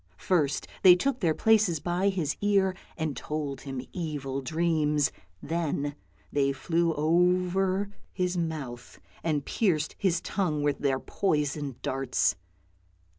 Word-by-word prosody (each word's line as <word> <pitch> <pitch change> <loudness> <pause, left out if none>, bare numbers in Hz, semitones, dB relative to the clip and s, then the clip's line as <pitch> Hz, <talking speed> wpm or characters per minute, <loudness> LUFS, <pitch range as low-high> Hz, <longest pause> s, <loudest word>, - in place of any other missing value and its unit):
First 150 - +1 0.2
they 180 -2 +9
took 260 +7 0
their 165 -6 +2
places 215 -7 +3
by 175 +5 +1
his 170 -6 -1
ear, 195 -2 +3 0.2
and 160 -4 -2
told 145 0 -4
him 135 -2 -5
evil 145 -6 -3
dreams; 155 -1 +1 0.3
then 145 -3 -1 0.4
they 140 -1 +2
flew 165 +5 +1
over 180 +4 +2 0.2
his 180 -1 -1
mouth 150 -8 -4 0.2
and 150 -4 0
pierced 160 -8 0
his 180 -4 +2
tongue 155 -8 -1
with 145 -1 +1
their 135 -2 +1
poisoned 145 -7 -1
darts. 135 -4 +1
160 Hz, 125 wpm, -28 LUFS, 145-180 Hz, 0.4 s, they